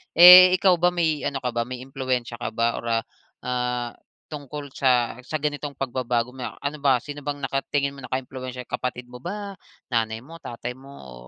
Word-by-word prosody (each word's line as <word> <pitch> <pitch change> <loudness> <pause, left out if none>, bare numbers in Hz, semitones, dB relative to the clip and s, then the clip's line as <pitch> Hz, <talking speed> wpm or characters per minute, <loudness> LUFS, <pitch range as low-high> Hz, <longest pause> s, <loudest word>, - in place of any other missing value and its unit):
Eh, 180 +1 +11
ikaw 185 -1 +3
ba 175 +1 +4
may 160 -4 +1
ano 135 -1 -4
ka 125 - -1
ba, 120 0 -2
may 125 0 -6
impluwensiya 130 -3 -3
ka - - -3
ba 115 0 +2
or - - -10
ah, 115 -1 +1 0.4
ah, 125 -1 -2 0.4
tungkol 145 -1 -7
sa 125 -3 +1
sa - - -4
ganitong 145 -1 -3
pagbabago? 125 -2 -1
May 130 -1 -6
a - - -10
ano 145 +1 -3
ba, 135 -4 +2
sino 145 0 -7
bang 145 0 -5
nakatingin 140 +1 -1
mo 140 - -12
naka-impluwensiya, 130 0 -5
kapatid 125 0 -5
mo 125 - -9
ba, 200 +6 -6 0.3
nanay 115 -1 -1
mo, 165 +5 -12
tatay 120 -4 -6
mo, 130 +2 -14 0.2
o 65 -1 -11
130 Hz, 190 wpm, -24 LUFS, 125-145 Hz, 0.4 s, Eh